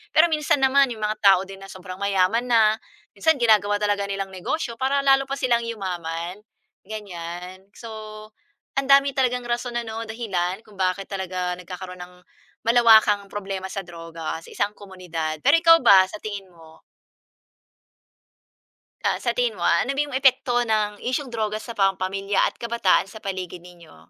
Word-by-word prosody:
Pero 320 +2 +7
minsan 300 -2 +1
naman 270 0 +4
yung 220 - -11
mga 215 0 -1
tao 190 -2 +7
din 195 0 -11
na 195 - -11
sobrang 185 0 -9
mayaman 200 +4 +1
na, 220 -3 +4 0.4
minsan 320 +11 +3
ginagawa 210 -3 +3
talaga 205 -1 0
nilang 195 -1 -3
negosyo 235 - -3
para 270 +2 +1
lalo 270 0 +4
pa 275 - -1
silang 235 -2 +1
yumaman 180 -5 -4 0.5
ganiyan. 185 -2 -8
So, 230 - -9 0.9
ang 275 0 0
dami 275 0 +6
talagang 250 -2 +1
rason 240 0 -2
ano, 225 -1 -4
dahilan 195 -4 -3
kung 210 -2 -18
bakit 185 +1 -1
talaga 185 -2 -3
nagkakaroon 180 0 -8
ng 180 0 -10 0.5
malawakang 220 -3 +5
problema 195 -2 -5
sa 195 - -4
droga 165 -2 -6
sa - - -14
isang 205 +1 -1
komunidad. 170 -5 -5
Pero 285 +5 +6
ikaw 330 0 +7
ba, 190 -1 +7
sa 210 - -8
tingin 205 -2 -6
mo? 160 -2 -18 2.2
Sa - - +2
sa - - +2
tingin - - 0
mo, - - -3
ah, - - +4
ano - - -3
ba - - +1
yung 285 - -9
epekto 260 -2 +3
ng 215 -3 +1 0.2
isyung 265 0 -2
droga 215 -1 -1
sa 235 - -8
pang-pamilya 195 0 0
at - - -3
kabataan 235 -5 +2
sa 220 - -10
paligid 185 -3 -5
ninyo? 170 - -16
205 Hz, 165 wpm, -23 LUFS, 185-235 Hz, 2.2 s, Pero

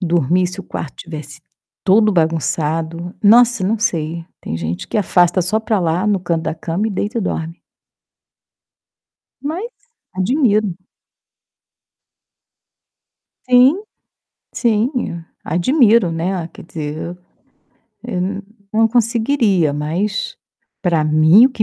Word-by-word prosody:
dormir 175 0 +2
se 180 +2 -6
o - - -9
quarto 160 - -6
estivesse 155 -2 -8 0.4
todo 210 +2 +4
bagunçado. 165 +1 -1
Nossa, 235 -1 +5
não 220 +2 0
sei, 165 -5 -2 0.2
tem 80 - -4
gente 85 +2 -4
que - - -1
afasta 180 -2 +3
só 200 +5 +1
pra 220 -2 0
lá, 175 +4 0
no 200 -3 +1
canto 170 -2 -1
da 160 - -2
cama 170 +6 -2
e 220 - -2
deita 205 +5 -2
e - - -1
dorme. 165 -3 -4 1.8
Mas 350 +12 -4 0.4
admiro. 210 - +1 2.7
Sim, 260 +10 +5 0.7
sim, 230 - 0 0.2
admiro, 220 - +3
né, 170 +1 -2
quer - - -13
dizer, 155 -2 -5 1.1
eu 210 -7 -3
não 195 +2 -2 0.3
não 225 +1 +4
conseguiria, 230 - +2
mas, 170 +9 -2 0.5
pra 165 -4 +1
mim, 155 +8 +6
o 265 - +4
que 225 -4 0
185 Hz, 115 wpm, -18 LUFS, 165-220 Hz, 2.7 s, mim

